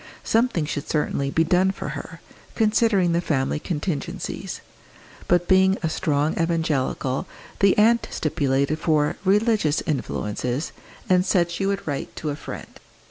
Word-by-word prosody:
Something 225 Hz, -8 st, +1 dB
should 145 Hz, -1 st, -4 dB
certainly 140 Hz, -2 st, 0 dB
be 160 Hz, +3 st, +2 dB
done 180 Hz, +3 st, +3 dB
for 195 Hz, -, -4 dB
her -, -, -7 dB, 0.3 s
considering 215 Hz, -5 st, +3 dB
the 170 Hz, +1 st, +1 dB
family 145 Hz, -3 st, 0 dB
contingencies. 150 Hz, -3 st, -4 dB, 0.7 s
But 175 Hz, 0 st, +2 dB
being 190 Hz, +1 st, +4 dB
a 165 Hz, -, +1 dB
strong 150 Hz, 0 st, 0 dB
evangelical, 155 Hz, -5 st, -1 dB, 0.3 s
the 195 Hz, -1 st, +4 dB
aunt 230 Hz, +2 st, +4 dB
stipulated 145 Hz, -1 st, 0 dB
for 150 Hz, -2 st, +1 dB
"religious 205 Hz, -5 st, +2 dB
influences," 125 Hz, -2 st, -2 dB, 0.4 s
and 180 Hz, -1 st, +4 dB
said 175 Hz, -2 st, +2 dB
she 195 Hz, +3 st, -1 dB
would 200 Hz, 0 st, -2 dB
write 145 Hz, -2 st, -4 dB
to 150 Hz, -, -3 dB
a -, -, -3 dB
friend. -, -, -9 dB
165 Hz, 135 wpm, -23 LUFS, 145-190 Hz, 0.7 s, being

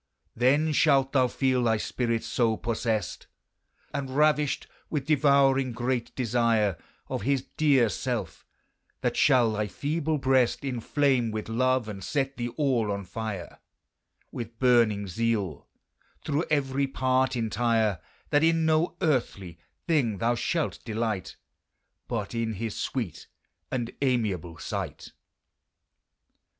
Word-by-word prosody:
Then 140 Hz, +7 st, +3 dB
shalt 140 Hz, -3 st, +3 dB
thou 130 Hz, -2 st, +4 dB
feele 130 Hz, 0 st, +1 dB
thy 110 Hz, -1 st, +3 dB
spirit 115 Hz, +1 st, -1 dB
so 115 Hz, -3 st, +1 dB
possest, 110 Hz, -4 st, -2 dB, 0.7 s
And 140 Hz, -2 st, -3 dB
ravisht 150 Hz, +1 st, +2 dB, 0.2 s
with 145 Hz, -4 st, -2 dB
devouring 140 Hz, -3 st, +3 dB
great 120 Hz, 0 st, -2 dB
desire 115 Hz, -5 st, +2 dB, 0.3 s
Of -, -, -3 dB
his 135 Hz, +3 st, +1 dB
deare 140 Hz, -5 st, +3 dB
selfe, -, -, -3 dB, 0.6 s
that -, -, 0 dB
shall 125 Hz, -5 st, +4 dB
thy 105 Hz, -1 st, -1 dB
feeble 155 Hz, -, -1 dB
brest 130 Hz, -2 st, +2 dB
Inflame 130 Hz, -1 st, +1 dB
with 110 Hz, -1 st, -4 dB
love, 130 Hz, 0 st, +1 dB
and 100 Hz, -3 st, -7 dB
set 135 Hz, +4 st, -1 dB
thee 120 Hz, -1 st, -2 dB
all 125 Hz, -8 st, +1 dB
on 100 Hz, 0 st, -3 dB
fire 100 Hz, -1 st, -6 dB, 0.7 s
With 115 Hz, -1 st, -7 dB
burning 115 Hz, -5 st, +3 dB
zeale, 105 Hz, -4 st, -2 dB, 0.6 s
through 150 Hz, +2 st, 0 dB
every 140 Hz, -2 st, +1 dB
part 130 Hz, 0 st, +1 dB
entire, 110 Hz, -3 st, +1 dB, 0.3 s
That 145 Hz, +1 st, +4 dB
in 165 Hz, 0 st, +3 dB
no 160 Hz, +1 st, +1 dB
earthly 100 Hz, -, -1 dB, 0.3 s
thing 135 Hz, -, +1 dB
thou 115 Hz, +4 st, +1 dB
shalt 160 Hz, +6 st, -2 dB
delight, 110 Hz, -4 st, -3 dB, 0.7 s
But 110 Hz, -3 st, -3 dB
in 115 Hz, -1 st, -1 dB
his 110 Hz, +2 st, -4 dB
sweet 115 Hz, -, -4 dB, 0.4 s
and 120 Hz, -2 st, -2 dB
amiable 105 Hz, -, 0 dB
sight. -, -, -5 dB
125 Hz, 120 wpm, -27 LUFS, 110-140 Hz, 0.7 s, thou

